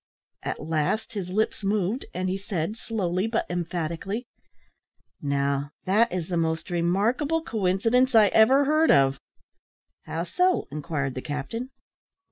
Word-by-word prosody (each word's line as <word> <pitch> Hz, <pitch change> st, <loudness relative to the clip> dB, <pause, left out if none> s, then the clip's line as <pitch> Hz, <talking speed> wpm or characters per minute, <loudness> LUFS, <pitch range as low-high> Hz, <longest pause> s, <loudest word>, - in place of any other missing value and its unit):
At -, -, -4 dB
last 160 Hz, +8 st, -1 dB
his 195 Hz, -4 st, -4 dB
lips 215 Hz, +2 st, -1 dB
moved, 205 Hz, +4 st, 0 dB
and 185 Hz, +1 st, -2 dB
he 185 Hz, -, 0 dB
said, 195 Hz, -1 st, -3 dB
slowly 195 Hz, -4 st, -1 dB
but 225 Hz, 0 st, 0 dB
emphatically 175 Hz, +5 st, -3 dB, 1.0 s
"Now, 140 Hz, 0 st, -1 dB
that 210 Hz, +5 st, +3 dB
is 175 Hz, -3 st, -3 dB
the 175 Hz, -, -1 dB
most 160 Hz, +1 st, -1 dB
remarkable 220 Hz, -, +1 dB
coincidence 225 Hz, -, +2 dB
I 215 Hz, -2 st, +7 dB
ever 265 Hz, +8 st, +5 dB
heard 310 Hz, +3 st, +3 dB
of." 135 Hz, 0 st, +4 dB, 0.9 s
"How 165 Hz, -, -3 dB
so?" 360 Hz, -, +1 dB
inquired 145 Hz, -2 st, -3 dB
the 130 Hz, -, -5 dB
captain. 155 Hz, -, -4 dB
185 Hz, 130 wpm, -26 LUFS, 160-225 Hz, 1.0 s, I